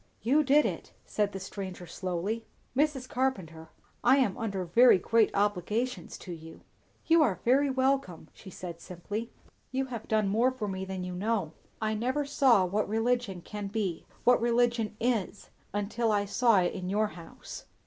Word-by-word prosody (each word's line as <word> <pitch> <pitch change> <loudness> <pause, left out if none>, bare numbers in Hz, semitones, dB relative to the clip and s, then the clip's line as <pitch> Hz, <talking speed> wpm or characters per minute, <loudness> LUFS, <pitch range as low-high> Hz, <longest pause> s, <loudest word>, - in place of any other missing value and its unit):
"You 280 +7 +4
did 290 +2 +4
it," - - -4
said 205 -1 0
the 195 - -6
stranger 190 -2 -7
slowly. 185 +6 -3 0.3
"Mrs. 275 -2 +1
Carpenter, 180 -13 -2 0.3
I 260 +3 +6
am 245 -9 +2
under 195 -5 -3
very 235 +7 +6
great 225 +4 +3
obligations 210 +5 -1
to 180 - -8
you." 160 0 -11 0.4
"You 330 0 +5
are 205 - +2
very 275 +4 +4
welcome," 260 -11 0
she 195 - -12
said 175 -2 -8
simply. 205 +6 -6 0.4
"You 265 +1 0
have 230 - -6
done 215 -2 +2
more 225 +6 +3
for 255 -5 -4
me 190 -1 -4
than 190 -1 -5
you 180 0 -5
know. 195 -3 -1 0.3
I 220 -1 0
never 255 +7 -1
saw 260 -8 +4
what 200 +3 -1
religion 225 -4 0
can 205 +2 -6
be 195 -5 -3 0.2
what 245 -1 +5
religion 235 -2 +1
is 225 -4 -1 0.2
until 215 +3 -1
I 205 -1 +1
saw 225 -1 +3
it 175 - 0
in 185 -2 -5
your 210 +2 +1
house." 170 -4 -10
215 Hz, 170 wpm, -29 LUFS, 190-245 Hz, 0.4 s, I